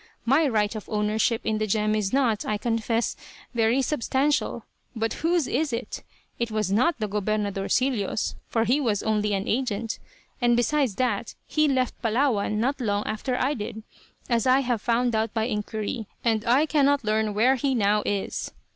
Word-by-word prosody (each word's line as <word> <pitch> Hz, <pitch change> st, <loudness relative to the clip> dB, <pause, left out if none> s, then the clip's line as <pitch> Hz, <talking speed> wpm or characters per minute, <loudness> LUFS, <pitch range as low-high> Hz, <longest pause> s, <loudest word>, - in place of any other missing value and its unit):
My 280 Hz, +6 st, +4 dB
right 215 Hz, -4 st, +1 dB
of 215 Hz, -, -7 dB
ownership 215 Hz, +2 st, +1 dB
in 215 Hz, -1 st, 0 dB
the 215 Hz, -, 0 dB
gem 215 Hz, +1 st, +1 dB
is 210 Hz, -3 st, 0 dB
not, 250 Hz, -6 st, +2 dB
I 210 Hz, -, -1 dB
confess, 230 Hz, +1 st, -1 dB, 0.4 s
very 235 Hz, +3 st, +2 dB
substantial; 290 Hz, +1 st, 0 dB, 0.3 s
but 225 Hz, 0 st, -1 dB
whose 335 Hz, -1 st, +2 dB
is 290 Hz, +4 st, 0 dB
it? 235 Hz, +2 st, -4 dB, 0.4 s
It 235 Hz, -1 st, -1 dB
was 215 Hz, -3 st, -1 dB
not 255 Hz, +12 st, +2 dB
the 215 Hz, -2 st, -2 dB
"Gobernadorcillo's," 210 Hz, +2 st, 0 dB
for 225 Hz, -, +1 dB
he 250 Hz, +5 st, +2 dB
was 215 Hz, -6 st, 0 dB
only 210 Hz, -1 st, +1 dB
an 195 Hz, +1 st, -3 dB
agent; 230 Hz, -2 st, -1 dB, 0.4 s
and 240 Hz, -1 st, +4 dB
besides 260 Hz, -3 st, +1 dB
that 235 Hz, -2 st, -1 dB
he 305 Hz, 0 st, +2 dB
left 260 Hz, -3 st, 0 dB
Palawan 230 Hz, -2 st, +1 dB
not 265 Hz, +4 st, 0 dB
long 205 Hz, -3 st, 0 dB
after 250 Hz, +4 st, -2 dB
I 270 Hz, +4 st, +1 dB
did, 220 Hz, -2 st, -6 dB, 0.4 s
as 235 Hz, 0 st, +1 dB
I 260 Hz, +2 st, +5 dB
have 245 Hz, -4 st, -1 dB
found 240 Hz, +1 st, +1 dB
out 220 Hz, 0 st, -1 dB
by 220 Hz, -, +1 dB
inquiry, 215 Hz, 0 st, -3 dB, 0.2 s
and 225 Hz, -2 st, +1 dB
I 260 Hz, +6 st, +4 dB
cannot 285 Hz, -3 st, +2 dB
learn 215 Hz, -1 st, 0 dB
where 240 Hz, +5 st, +4 dB
he 270 Hz, 0 st, 0 dB
now 210 Hz, -2 st, +2 dB
is. 200 Hz, -1 st, -2 dB
230 Hz, 175 wpm, -25 LUFS, 215-255 Hz, 0.4 s, I